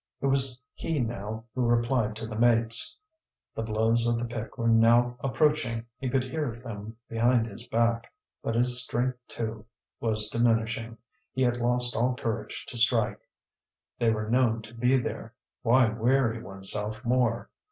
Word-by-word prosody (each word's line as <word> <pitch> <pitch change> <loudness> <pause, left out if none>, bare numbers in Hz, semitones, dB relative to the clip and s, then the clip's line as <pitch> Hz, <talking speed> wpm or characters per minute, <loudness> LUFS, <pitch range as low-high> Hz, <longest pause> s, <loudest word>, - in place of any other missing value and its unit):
It - - -3
was 135 -2 +2
he 160 -3 -2
now 110 -2 -4
who 130 - -2
replied 120 -2 +1
to 110 - -6
the 110 -1 -6
mates. 115 - +3 0.5
The - - -4
blows 115 +1 +1
of 120 0 +1
the 120 - -2
pick 115 0 -6
were 115 -2 -1
now 115 +2 +4
approaching, 125 -3 0
he 130 - -2
could 130 0 +1
hear 130 -2 -3
them 110 -2 -8
behind 115 +1 +2
his 115 +1 -10
back. 115 0 0 0.3
But 115 - -2
his 125 +1 +5
strength, 125 +1 -1
too, 110 -1 -5 0.3
was 110 -2 +1
diminishing; 115 0 0 0.4
he 130 - 0
had 120 -1 +2
lost 120 0 +1
all 125 +2 +1
courage 115 -2 -4
to 120 - -1
strike. 115 -2 +2 0.8
They 120 -2 +3
were 110 -1 -1
known 115 -1 +2
to 110 +2 -12
be 125 +3 +2
there; 125 - -5 0.3
why 120 0 +4
weary 115 +1 +1
oneself 105 +4 -4
more? 120 -1 +1
115 Hz, 160 wpm, -27 LUFS, 115-125 Hz, 0.8 s, his